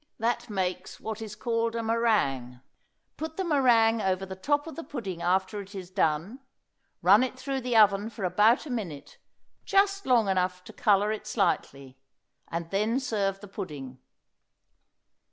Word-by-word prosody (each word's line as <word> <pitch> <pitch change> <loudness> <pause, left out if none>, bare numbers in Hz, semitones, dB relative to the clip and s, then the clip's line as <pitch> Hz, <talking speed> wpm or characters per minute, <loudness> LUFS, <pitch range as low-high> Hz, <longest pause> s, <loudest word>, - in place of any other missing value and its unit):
That 235 +1 -1
makes 185 -2 -3
what 220 0 -5
is 215 -2 -7
called 230 0 -1
a 230 - -2
meringue. 200 - 0 0.6
Put 320 0 -6
the 380 - 0
meringue 240 -8 +4
over 190 -1 0
the 190 0 -7
top 290 +9 0
of 325 - -8
the 330 - -6
pudding 195 - -6
after 190 +3 0
it 200 +1 -12
is 185 -2 -7
done; 185 - 0 0.6
run 200 +5 +7
it 255 0 -2
through 270 0 -3
the 245 -2 +1
oven 205 0 +5
for 220 -3 -8
about 210 - +3
a 290 - -6
minute, 180 -12 -6 0.4
just 395 -2 +2
long 240 -5 +4
enough 180 -1 0
to - - -12
color 205 0 +3
it 215 - -5
slightly, 140 - -1 0.5
and 170 0 -5
then 215 +6 +1
serve 200 -7 -1
the 205 - -9
pudding. 145 -10 -7
210 Hz, 160 wpm, -28 LUFS, 185-235 Hz, 0.6 s, run